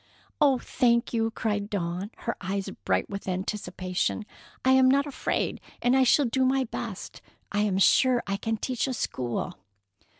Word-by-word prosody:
"Oh, 275 -3 +5
thank 235 -1 +1
you!" 225 -1 +1
cried 210 -2 -2
Dawn, 180 0 -3 0.2
her 235 - -1
eyes 195 +1 -2 0.2
bright - - +1
with 200 -1 -7
anticipation. 185 +1 -2 0.4
"I 260 - +5
am 260 0 +6
not 280 +2 +3
afraid, 285 - -2 0.2
and 245 +1 +3
I 265 - +5
shall 280 +3 +5
do 260 +2 +1
my 265 +1 +3
best. 225 -4 -6 0.3
I 205 - 0
am 205 -2 +1
sure 245 +5 +4
I 195 0 -1
can 225 +2 -2
teach 255 +3 -1
a 260 - -2
school." 120 - -3
225 Hz, 165 wpm, -27 LUFS, 195-255 Hz, 0.4 s, am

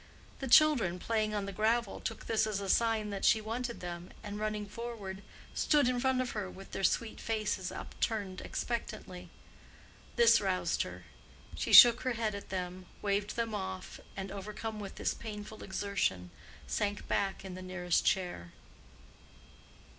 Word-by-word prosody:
The 270 - -3
children, 250 - +5
playing 215 +1 0
on 205 -1 -1
the 200 - -4
gravel, 220 +2 +1
took 225 - -5
this 220 -1 +2
as 210 -2 -1
a 195 -1 -4
sign 220 -1 +2
that 200 -1 -4
she 220 - +5
wanted 235 +3 -4
them, 175 0 -6
and, 205 -1 -5
running 215 -1 -2
forward, 205 -3 -6 0.3
stood 295 -4 +3
in 250 -1 +1
front 260 0 +2
of 255 - -2
her 205 -3 -3
with 195 +1 -12
their - - -4
sweet 220 +4 +1
faces 210 -4 -1
upturned 200 -4 -3
expectantly. 180 -6 -4 0.9
This 230 -1 +6
roused 190 -2 0
her: - - -6 0.5
she - - -2
shook 240 -1 +10
her 255 -1 0
head 225 -2 -1
at 200 - -7
them, 180 -1 -4 0.2
waved 205 0 0
them 230 -1 -1
off, 190 -2 -5 0.2
and 195 0 -4
overcome 210 +2 -5
with 200 -2 -7
this - - 0
painful 215 -1 -8
exertion, 190 - -1 0.3
sank 205 0 -2
back 195 -1 -1
in 190 - -6
the 185 - -7
nearest 185 -2 0
chair. 175 - -1
210 Hz, 160 wpm, -32 LUFS, 190-230 Hz, 0.9 s, shook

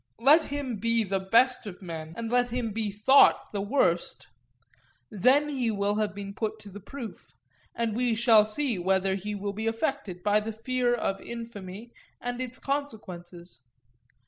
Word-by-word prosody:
Let 295 +7 +6
him 275 -5 -4
be 230 +2 +1
the 195 -1 -1
best 230 +5 +3
of 185 -3 -8
men, 165 -2 -7
and 230 0 -4
let 245 0 +2
him 240 -2 -2
be 215 -1 -2
thought 215 +8 +5
the 200 - -1
worst; 200 - 0 0.8
then 255 +8 +3
he 260 -5 -1
will 205 -1 0
have 210 -2 -1
been 200 0 -6
put 220 +1 -3
to 205 - -11
the 205 - -9
proof; 235 +2 -9 0.4
and 230 -2 -1
we 240 -1 +1
shall 225 -2 +6
see 225 0 -1
whether 190 +1 +1
he 205 +2 -4
will 200 0 -4
be 220 +2 -3
affected 225 - -2
by 210 0 +3
the 220 +1 -5
fear 245 +2 0
of 195 -5 -1
infamy 230 -2 -8 0.3
and 245 +1 -4
its 255 0 -4
consequences. 180 - -6
220 Hz, 170 wpm, -28 LUFS, 200-245 Hz, 0.8 s, Let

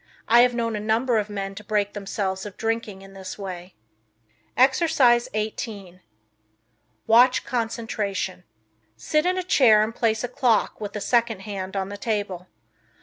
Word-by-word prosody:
I 235 +1 +6
have 245 0 +3
known 230 -2 -1
a - - -2
number 225 +2 +1
of 210 0 -4
men 195 -1 -4
to 205 +2 -10
break 205 -1 -1
themselves 195 -1 -3
of 205 -2 -9
drinking 225 -3 -3
in 195 0 -14
this 190 -1 -8
way. 185 -2 -8 0.8
Exercise 265 -3 +4
18 210 -4 -5 1.0
Watch 245 +3 +5
Concentration. 225 -6 -3 0.5
Sit 305 - 0
in 365 0 +1
a 370 - -1
chair 230 -11 +5
and 220 +1 -3
place 225 -1 0
a - - -1
clock 245 -4 +1
with 205 0 -6
a 210 - -4
second 230 -2 +1
hand 190 -1 -6
on 195 0 -2
the 205 - -7
table. 200 -5 -3
215 Hz, 155 wpm, -24 LUFS, 195-235 Hz, 1.0 s, I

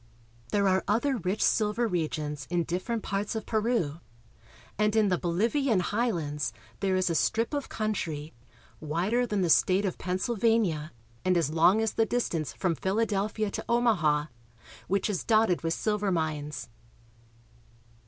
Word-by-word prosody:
There 200 -1 +2
are 190 0 +2
other 245 +6 +1
rich 190 +1 -1
silver 215 +2 +2
regions 155 -6 -3
in 175 0 +1
different 185 +7 -3
parts 200 +2 -2
of 220 - -3
Peru, 215 -9 0 0.8
and 210 +1 +1
in 215 -2 +4
the 180 - +2
BoHvian 220 - +1
highlands 175 - -1 0.3
there 190 -2 +1
is 185 -1 +1
a - - +1
strip 230 - +1
of 285 -1 -2
country, 165 -8 -3 0.5
wider 185 +11 0
than 210 -3 0
the 175 - +1
state 190 +5 +4
of 185 - -3
Pennsylvania, 190 -4 0 0.3
and 185 -1 +2
as 160 -3 +1
long 180 +7 +4
as 225 - -1
the 225 - +2
distance 170 -11 -1
from 180 -3 -1
Philadelphia 210 +3 -1
to - - -5
Omaha, 185 -12 +2 0.6
which 195 +1 +1
is 205 -4 -2
dotted 215 -5 +3
with 165 0 -1
silver 210 -2 0
mines. 155 -3 -2
195 Hz, 145 wpm, -28 LUFS, 170-220 Hz, 0.8 s, in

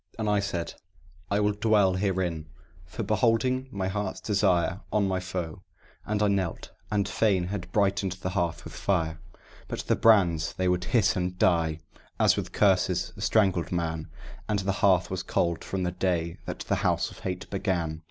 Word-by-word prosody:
And 110 -1 -2
I 105 0 +3
said, 90 -4 -3 0.6
"I 100 - +1
will 105 0 +3
dwell 105 -2 +3
herein, 90 -4 -1 0.4
for 110 +6 -5
beholding 120 +5 +1
my 95 -4 -3
heart's 100 0 -3
desire 95 -3 +1
On 105 -2 +2
my 95 -1 0
foe;" 90 -3 -5 0.5
and 105 0 0
I - - +4
knelt, 95 -4 -1 0.2
and 100 -2 +1
fain 95 -3 +1
had 100 -3 -5
brightened 100 -2 +1
the 90 0 -5
hearth 85 -4 -1
with - - -9
fire; 80 -4 -1 0.5
But - - -4
the - - +1
brands 90 -8 +4
they 95 - -1
would 90 -1 +1
hiss 105 +2 +3
and 90 0 -2
die, 80 -3 +2 0.4
as - - +5
with - - -4
curses - - +2
a - - -10
strangled 95 -6 +2
man, 80 -2 -2 0.4
And 105 - +2
the 100 0 0
hearth 95 -4 +4
was - - -2
cold 85 -1 -1
from 95 -1 -3
the 90 - 0
day 90 -2 -1
that - - -5
the - - -1
House - - 0
of - - -13
Hate 90 -1 -4
began. 85 -5 -1
95 Hz, 180 wpm, -27 LUFS, 85-105 Hz, 0.6 s, as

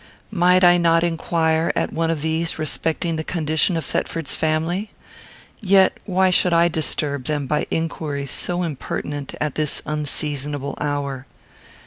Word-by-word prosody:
Might 180 -1 +4
I 175 0 +7
not 165 -1 +3
inquire, 165 -1 +1
at - - -1
one 165 0 0
of 160 -3 -1
these, 160 +1 -1
respecting 160 +2 0
the 160 - -2
condition 160 +1 0
of 160 - -3
Thetford's 165 0 -2
family? 165 +6 -1 0.7
Yet 195 -2 +4
why 190 -1 +3
should 180 0 +3
I 170 +1 +4
disturb 145 -4 -2
them 150 -1 -1
by 150 +2 -1
inquiries 150 -4 -3
so 175 0 -1
impertinent 145 -2 -4
at 150 -2 -1
this 155 -2 -1
unseasonable 145 -1 -2
hour? 140 -3 -3
160 Hz, 140 wpm, -21 LUFS, 150-170 Hz, 0.7 s, I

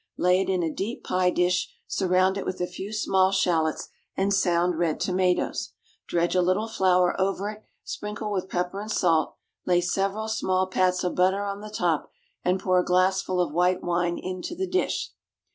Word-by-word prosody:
Lay 180 +1 +3
it 195 - -2
in 185 -2 +1
a 160 -2 -1
deep 215 +6 -4
pie 185 0 +1
dish, 180 +1 +1
surround 185 0 +2
it 200 - -3
with 185 - -4
a 180 - 0
few 195 +3 -7
small 190 -3 +2
shallots 170 -5 +1 0.3
and 195 +1 +1
sound 175 -3 +2
red 165 -3 0
tomatoes, 185 -1 0 0.3
dredge 170 0 +1
a 180 - +4
little 185 +5 +1
flour 185 -4 +2
over 195 +2 0
it, 215 0 -13 0.2
sprinkle 210 +1 -5
with 190 -2 -2
pepper 180 +2 -2
and 215 - -7
salt, 165 -6 +2 0.3
lay 175 -1 +4
several 195 +4 -1
small 190 -4 0
pats 185 -1 +1
of 180 - -1
butter 190 +2 +2
on 200 0 -4
the 215 - -8
top, 175 -7 -1 0.3
and 180 +1 +1
pour 185 -1 +2
a - - +2
glassful 185 0 +1
of 175 -4 0
white 180 +2 +2
wine 175 0 0
into 185 - -5
the 380 +2 -2
dish. 370 0 -1
185 Hz, 185 wpm, -26 LUFS, 180-195 Hz, 0.3 s, a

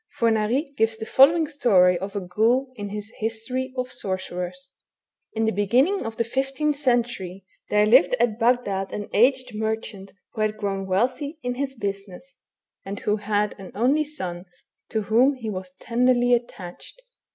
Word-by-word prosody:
Fornari 230 +5 +1
gives 225 0 +2
the 220 - -6
following 310 +7 +5
story 205 - +4
of 195 +2 -6
a - - 0
ghoul 230 +8 +1
in 205 -3 -6
his 210 +1 -6
History 230 +4 -3
of 255 0 -2
Sorcerers: 185 +4 -5 0.3
— - - -53
In 225 0 +1
the 220 - +2
beginning 245 - +2
of 225 - -7
the 230 - +2
15th 270 +5 -1
century, 240 -9 -1 0.2
there 210 0 +4
lived 255 - +5
at 225 -2 +1
Bagdad 230 -5 +1
an 205 - -5
aged 255 +3 +3
merchant 220 -2 -4 0.2
who 220 - -4
had 215 0 0
grown 195 -2 -3
wealthy 255 - -1
in 245 0 -1
his 270 +1 -3
business, 200 +3 -6 0.4
and 195 +1 -6
who 210 0 +1
had 210 0 0
an 190 - -9
only 265 +8 +2
son 185 - -6 0.4
to 220 -1 -1
whom 245 +7 +3
he 230 -4 -5
was 185 -1 -7
tenderly 245 0 +2
attached. 235 - -4
225 Hz, 165 wpm, -24 LUFS, 200-255 Hz, 0.4 s, following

